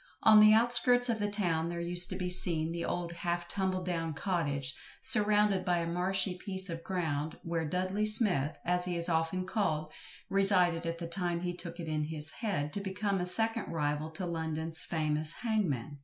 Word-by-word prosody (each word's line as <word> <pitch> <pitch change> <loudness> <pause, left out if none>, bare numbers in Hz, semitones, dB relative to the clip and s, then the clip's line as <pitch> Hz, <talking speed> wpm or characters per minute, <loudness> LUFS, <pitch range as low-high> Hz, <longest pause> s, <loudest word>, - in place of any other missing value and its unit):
On 215 -1 +7
the 215 0 +7
outskirts 240 +2 +3
of 225 -2 -1
the 205 0 -1
town 170 -6 -1
there 170 0 -5
used 175 +1 +5
to 185 - -4
be 180 -1 -3
seen 170 -3 +4
the 170 0 -4
old 175 -1 -3
half 175 0 -3
tumbled 185 -1 -2
down 165 -3 -3
cottage, 145 -7 -2 0.2
surrounded 210 -6 +3
by 180 -1 0
a 170 - -2
marshy 180 +2 -1
piece 190 -2 0
of 165 0 -7
ground, 160 -5 -3
where 165 -2 -3
"Dudley 185 +5 -1
Smith," 195 - +5
as 180 +1 +1
he 180 -1 -3
is 170 +1 +3
often 165 +3 -1
called, 160 -7 -2 0.4
resided 180 -4 +2
at 165 0 -3
the 170 - -6
time 170 0 -3
he 175 0 -3
took 175 -1 -7
it 165 - -6
into 155 -1 -2
his 155 -1 -3
head 180 -10 -3
to 200 - -3
become 195 0 -2
a 180 - -3
second 225 +3 +1
rival 150 -1 -2
to 180 +3 -4
London's 160 -1 -3
famous 155 -1 0
hangman. 155 - -3
175 Hz, 190 wpm, -30 LUFS, 160-195 Hz, 0.4 s, On